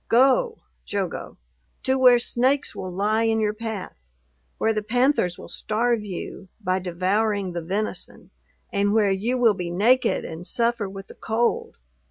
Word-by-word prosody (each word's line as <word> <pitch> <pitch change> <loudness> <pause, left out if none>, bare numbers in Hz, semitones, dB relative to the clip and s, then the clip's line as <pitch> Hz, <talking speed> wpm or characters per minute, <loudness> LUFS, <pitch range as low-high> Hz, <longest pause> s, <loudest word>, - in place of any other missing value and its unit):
Go 275 - +4 0.3
(Jogo) 195 -4 -4 0.5
to 260 - +2
where 250 -2 +7
snakes 260 +4 0
will 185 -1 -5
lie 210 +4 +1
in 225 0 +2
your 210 -1 +1
path; 210 - -7 0.5
where 225 - +2
the 215 - -1
panthers 245 -5 +1
will - - -10
starve 230 +1 0
you, 190 -1 -7
by 185 -3 0
devouring 190 +2 0
the 170 - -3
venison; 195 +6 -4 0.4
and 200 +1 +2
where 210 -3 +4
you 220 +7 0
will 235 -3 +5
be 180 -3 -4
naked 230 +9 +2
and 165 +3 -5
suffer 235 -4 0
with 195 0 -8
the - - -13
cold! 240 - -1
215 Hz, 155 wpm, -24 LUFS, 190-240 Hz, 0.5 s, where